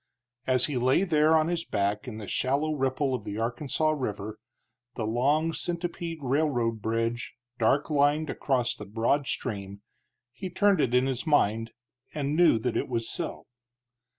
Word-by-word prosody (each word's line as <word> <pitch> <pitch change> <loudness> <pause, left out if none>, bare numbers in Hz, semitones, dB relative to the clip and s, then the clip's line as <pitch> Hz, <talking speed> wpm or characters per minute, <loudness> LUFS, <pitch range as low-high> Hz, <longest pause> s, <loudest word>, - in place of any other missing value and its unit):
As 130 -1 +4
he 145 -4 -2
lay 130 +8 +3
there 155 -3 +4
on 155 0 +3
his 170 -1 -1
back 105 -3 -1
in 110 -3 -6
the 110 - -6
shallow 140 +8 0
ripple 135 -1 0
of 125 -5 -2
the 100 +1 -5
Arkansas 130 +7 0
River, 110 -7 -4 0.6
the 110 - -2
long 145 +9 +1
centipede 170 -1 -4
railroad 125 -5 0
bridge 115 +2 -2 0.2
dark 135 +6 +2
lined 145 +2 +3
across 130 -4 0
the - - -9
broad 115 +7 0
stream, 100 -4 -4 0.5
he 185 +9 -6
turned 195 -1 +3
it 125 -2 +1
in 125 +1 +4
his 135 +3 -2
mind 115 -6 +2 0.4
and 145 0 -1
knew 170 -7 +5
that 115 +1 -2
it - - 0
was 115 -2 -2
so. - - -5
130 Hz, 160 wpm, -28 LUFS, 115-155 Hz, 0.6 s, knew